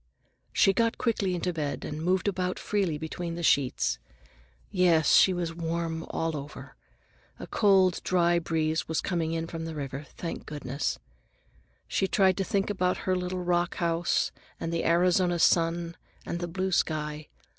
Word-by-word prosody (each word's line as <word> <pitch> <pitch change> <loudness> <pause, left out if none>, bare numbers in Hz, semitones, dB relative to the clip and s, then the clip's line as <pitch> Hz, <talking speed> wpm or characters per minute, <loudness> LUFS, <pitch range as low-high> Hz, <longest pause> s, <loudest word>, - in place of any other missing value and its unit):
She 195 - +4
got 230 +3 +1
quickly 205 -6 0
into 180 +1 -2
bed 150 -3 -3
and 150 +1 -5
moved 185 +4 +1
about 185 -2 -1
freely 195 -7 -1
between 165 +2 -5
the 170 - -5
sheets. 130 - +2 0.7
Yes, 175 -5 +4
she 190 - +7
was 175 -2 -2
warm 165 -1 -3
all 165 -1 -2
over. 145 0 -8 0.6
A - - -7
cold, 190 -4 +3
dry 175 -1 +3
breeze 160 -1 -1
was 160 - 0
coming 165 -3 -1
in 165 0 -2
from 165 0 -6
the 165 -1 -5
river, 140 0 -5
thank 170 - -5
goodness! 140 -1 -3 0.9
She 190 - 0
tried 190 -1 +3
to 195 - +1
think 195 +1 0
about 185 -2 0
her 185 - +2
little 180 0 -3
rock 175 0 +1
house 170 0 +1 0.3
and 165 - -3
the 170 - -1
Arizona 175 +1 +3
sun 170 0 +2 0.3
and 170 - -3
the 175 - -3
blue 185 +2 -2
sky. 150 -3 -1
170 Hz, 160 wpm, -28 LUFS, 160-185 Hz, 0.9 s, she